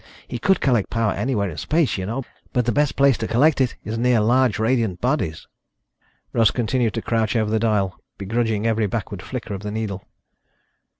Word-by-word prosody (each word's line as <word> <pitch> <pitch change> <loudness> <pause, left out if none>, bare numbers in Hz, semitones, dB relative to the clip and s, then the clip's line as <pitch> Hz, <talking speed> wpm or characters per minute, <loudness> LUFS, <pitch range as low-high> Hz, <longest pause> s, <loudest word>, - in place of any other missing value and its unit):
He 120 - -5
could 190 +9 +2
collect 120 -7 +2
power 115 -2 +1
anywhere 115 -6 -1
in 75 - -9
space, 160 -2 +1
you 95 -1 -4
know, 125 +5 -3 0.3
but 125 -2 +1
the 120 - +2
best 145 +4 +1
place 135 -1 +4
to - - -2
collect 140 +4 +3
it 125 - +1
is 110 +2 -4
near 125 -1 +3
large 120 +1 +3
radiant 110 -4 0
bodies." 125 - -1 0.9
Russ 115 -3 +4
continued 120 -1 0
to 115 - -3
crouch 115 -1 0
over 110 -2 +1
the 110 - +2
dial, 105 -3 0 0.2
begrudging 110 +1 -1
every 110 -2 +1
backward 100 -2 -4
flicker 120 -1 -6
of 95 - -5
the 105 - -5
needle. 105 -3 -4
115 Hz, 190 wpm, -22 LUFS, 105-125 Hz, 0.9 s, place